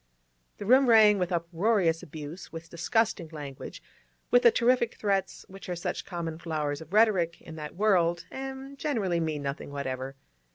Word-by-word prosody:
The 205 - -6
room 260 +4 +5
rang 215 -3 +7
with 180 0 -1
uproarious 170 0 +1
abuse, 155 0 -9
with 165 0 -9
disgusting 175 +1 0
language, 145 -4 -8 0.5
with 245 - +6
the 235 - +8
terrific 240 0 +2
threats 195 -2 -1
which 195 0 -11
are 180 - -2
such 170 - -4
common 165 -3 -5
flowers 155 -3 -3
of 160 +1 -12
rhetoric 195 -6 +3
in 160 - -11
that 150 0 -7
world, 175 -4 +2
and 270 +1 -7
generally 205 - 0
mean 155 -3 -2
nothing 140 +1 -4
whatever. 135 -1 -4
175 Hz, 160 wpm, -28 LUFS, 160-215 Hz, 0.5 s, the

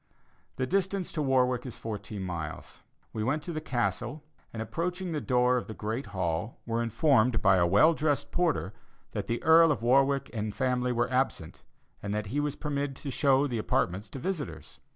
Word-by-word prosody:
The 130 - -1
distance 190 +4 -1
to 155 - -2
Warwick 130 -3 +2
is 125 - -7
fourteen 105 -2 -5
miles. 85 -5 -6 0.3
We 110 - -2
went 145 +6 0
to 170 - -5
the 155 - -3
Castle, 120 +1 -2 0.3
and 115 - -7
approaching 175 +9 -3
the 150 -2 -2
door 125 0 +3
of 125 - -4
the 110 - -7
Great 110 +6 -3
Hall, 90 +2 -2
were 115 0 -1
informed 120 -1 +3
by 95 -2 +5
a 85 -1 +4
well 130 - +5
dressed 150 -2 -1
porter 165 - 0 0.4
that - - -4
the 115 - -2
Earl 165 0 +7
of 135 - -2
Warwick 135 +2 +3
and 105 -2 -3
family 125 -1 0
were 120 +1 0
absent, 130 -11 -1 0.4
and 100 +1 -3
that 105 0 -2
he 145 - +1
was 145 -1 -1
permitted 145 -2 -3
to 140 +1 -6
show 135 0 +3
the 120 -5 -2
apartments 100 -1 -1
to 135 - -8
visitors. 155 -1 -5
125 Hz, 190 wpm, -29 LUFS, 110-150 Hz, 0.4 s, Earl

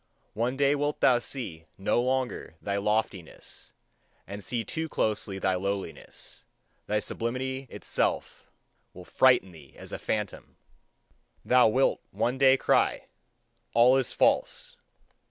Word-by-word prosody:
One 120 +4 -1
day 140 0 +4
wilt 145 +1 -1
thou 125 -2 +5
see 115 - -4
no 100 +4 +1
longer 130 -8 -2
thy 100 0 -2
loftiness, 100 -4 -3 0.5
and 100 +1 -7
see 120 +2 -2
too 160 +9 -4
closely 105 -5 -1
thy 95 -1 +1
lowliness; 95 -1 -4 0.4
thy 105 - +1
sublimity 130 +5 -3
itself - - -2 0.5
will 90 0 -10
frighten 125 -6 +4
thee 75 -5 -15
as - - -10
a - - -5
phantom. 105 -2 -4 0.9
Thou 125 -1 +6
wilt 130 +5 +2
one 125 +2 -1
day 135 -1 +6
cry: - - +1 0.7
"All 120 +3 +6
is 135 -2 +1
false!" - - +1
115 Hz, 125 wpm, -28 LUFS, 100-130 Hz, 0.9 s, Thou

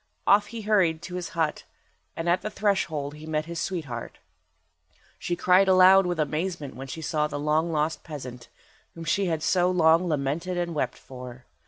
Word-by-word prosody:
Off 205 +1 +5
he 230 -1 -7
hurried 190 -7 +2
to 180 +1 -8
his 180 -1 -4
hut, 160 -2 0 0.5
and 165 - -4
at 175 +2 +2
the 215 - -4
threshold 190 -9 -1
he 150 +1 -11
met 155 -1 -1
his 170 0 -5
sweetheart. 145 -11 -4 1.0
She 175 - -2
cried 185 +2 +4
aloud 190 0 +6
with 175 -2 -2
amazement 155 0 -2
when 135 +1 -8
she 160 +4 -7
saw 150 0 0
the 145 -1 -5
long 155 +3 +1
lost 155 0 -1
peasant, 125 -6 -8 0.5
whom 165 - -8
she 195 +3 +1
had 160 -2 -1
so 180 -1 +3
long 170 0 +4
lamented 160 +4 -2
and 175 -1 -2
wept 130 -5 -2
for. 125 -1 -11
165 Hz, 180 wpm, -26 LUFS, 150-180 Hz, 1.0 s, aloud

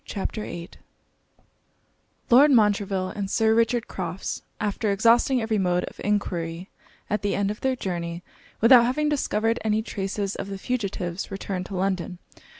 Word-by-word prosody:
CHAPTER 210 +2 -4
VIII 170 -3 -7 1.6
Lord 275 +5 +8
Montreville 205 -6 +2
and 200 -1 -4
Sir 220 +1 +3
Richard 230 +1 +2
Crofts, 180 0 -4 0.2
after 210 +1 -1
exhausting 230 +4 +3
every 220 -1 0
mode 180 -1 +1
of - - -8
enquiry 180 -4 -2 0.4
at 210 -1 -1
the 205 - 0
end 200 0 0
of 210 - -8
their 265 -1 +1
journey, 175 -5 -4 0.4
without 235 +1 +8
having 300 +4 0
discovered 230 -5 0
any 220 0 +1
traces 195 -1 -3
of - - -5
the 195 -1 -5
fugitives, 195 -6 -3
returned 190 -1 -4
to 195 - -6
London. 185 -1 -1
205 Hz, 150 wpm, -25 LUFS, 185-225 Hz, 1.6 s, Lord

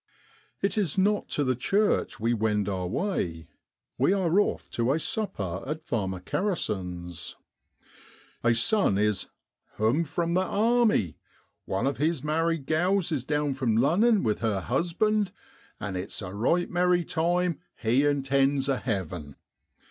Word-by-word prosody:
It 200 +2 +1
is 180 -6 0
not 205 +2 +2
to 145 - 0
the 130 -2 +1
church 200 - +1
we 115 +2 +1
wend 105 -2 0
our 95 -3 -2
way; 90 - -2 0.5
we 135 +9 +4
are 185 -1 +2
off 205 - 0
to 120 +2 +1
a - - +1
sup 215 +6 -2
per 95 -2 -4
at 155 +2 -4
Farmer 95 -5 -2
Kerrison's. 90 - -3 1.1
A 120 -1 +4
son 115 - +2
is 105 -1 0 0.5
'hoarn 120 +10 +2
from 170 +2 -1
th' 180 - +3
army, 210 - +2 0.5
one 95 +6 -1
of 140 0 0
his 155 -1 0
married 160 0 0
gals 175 +4 +1
is 145 -6 -1
down 145 0 0
from 125 -5 0
Lunnen 195 - +4
with 110 -3 0
her 105 -4 0
husband, 185 - 0 0.5
and 100 -2 -4
it's 90 +3 -5
a 90 0 -6
right 165 - +1
merry 180 -1 +2
time 175 +1 0 0.2
he 120 +4 +2
intends 140 -1 +2
a 135 -2 +1
havin'. 90 - -4
140 Hz, 150 wpm, -27 LUFS, 105-175 Hz, 1.1 s, we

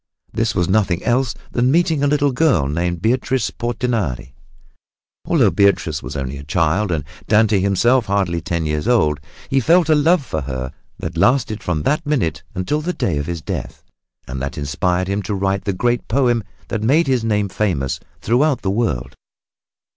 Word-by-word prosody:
This 110 -3 0
was 90 -2 +1
nothing 95 -3 +1
else 125 0 +1 0.2
than 125 +1 +1
meeting 160 0 +2
a 145 - +3
little 145 -1 +2
girl 125 - +2
named 85 +4 -2
Beatrice 125 0 +1
Portinari. 115 - -2 0.9
Although - - +3
Beatrice 100 -6 +2
was 65 +4 -7
only 70 0 -4
a - - -9
child, 85 +6 +1
and 80 -4 -1 0.2
Dante 105 -2 +4
himself 110 +6 +2
hardly 95 -4 0
ten 85 -2 -2
years 75 +5 -2
old, 85 -12 +2 0.3
he 135 - +2
felt 165 +4 +3
a - - +6
love 155 +1 +3
for 80 - -3
her 65 -1 -4 0.3
that - - -6
lasted 120 -4 +2
from 80 -7 -2
that 150 - +1
minute 100 - -1
until 95 +12 -1
the 180 +4 -2
day 80 - -1
of 70 - -4
his 85 -3 -4
death - - -5 0.4
and 65 +1 -5
that 70 +1 -4
inspired 90 +6 -1
him 100 +2 -1
to 105 0 -3
write 95 0 -1
the 100 - +1
great 120 +6 -1
poem 120 -2 +2 0.3
that 110 - -2
made 145 +10 +3
his 130 -4 +1
name 105 -2 +1
famous 90 -10 -1 0.2
throughout 130 +5 +2
the 95 - 0
world. 70 - -1
100 Hz, 175 wpm, -19 LUFS, 85-125 Hz, 0.9 s, a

